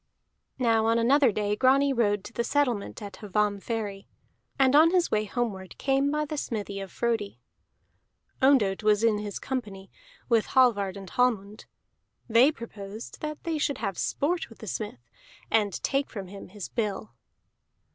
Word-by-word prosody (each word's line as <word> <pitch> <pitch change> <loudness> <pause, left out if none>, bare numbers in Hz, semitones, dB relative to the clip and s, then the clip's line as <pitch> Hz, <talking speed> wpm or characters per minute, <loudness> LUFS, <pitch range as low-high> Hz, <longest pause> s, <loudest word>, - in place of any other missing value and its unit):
Now 225 -3 +2
on 230 +1 +3
another 260 +2 +4
day 210 0 -1
Grani 270 +4 +4
rode 205 -5 +1
to 230 - -10
the 235 - -1
settlement 240 -6 -1
at 200 -2 -9
Hvammferry, 205 0 -2 0.5
and 270 -1 +4
on 315 +2 +7
his 355 -1 +2
way 215 0 +1
homeward 200 -5 -4
came 270 +1 +1
by 300 +1 0
the 300 +1 -5
smithy 205 -6 -4
of 195 -2 -7
Frodi. 225 - -2 1.0
Ondott 250 -8 +4
was 210 0 +3
in 220 -2 +3
his 205 -1 -5
company, 205 -7 -5 0.4
with 230 -3 +2
Hallvard 205 -7 +3
and 195 -1 -9
Hallmund; 215 -4 0 0.6
they 245 +5 +5
proposed 220 -4 -9
that 305 0 -5
they 325 -3 -2
should 285 -2 0
have 195 -6 -3
sport 335 - -1
with 225 - -15
the - - -10
smith, 200 - -5 0.4
and 210 -3 +2
take 275 0 0
from 195 -4 -7
him 200 0 -9
his 200 0 -8
bill. 215 -2 -3
225 Hz, 155 wpm, -27 LUFS, 205-265 Hz, 1.0 s, on